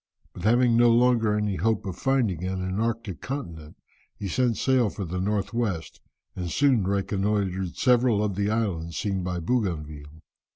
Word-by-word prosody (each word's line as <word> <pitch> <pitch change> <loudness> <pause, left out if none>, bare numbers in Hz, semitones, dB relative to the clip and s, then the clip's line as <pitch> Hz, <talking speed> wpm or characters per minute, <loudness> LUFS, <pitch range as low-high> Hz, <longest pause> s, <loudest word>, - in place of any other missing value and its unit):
But 90 - -7
having 120 +1 +4
no 120 0 +5
longer 115 -3 +3
any 105 -2 -1
hope 110 -2 0
of 95 -3 -4
finding 115 - 0
an 95 0 -2
Antarctic 110 -1 -2
continent, 85 - -6 0.4
he 100 - -4
set 120 +3 +1
sail 130 -4 +2
for 100 - -5
the 90 +2 -3
north 100 +1 -1
west, 105 -9 -3 0.3
and 90 -2 -4
soon 125 - +2
reconnoitred 100 -2 -1
several 125 -4 +3
of 105 -2 -1
the 100 +2 -1
islands 95 -7 -2
seen 100 -2 -1
by 90 0 -3
Bougainville. 80 -7 -3
100 Hz, 160 wpm, -26 LUFS, 90-115 Hz, 0.4 s, no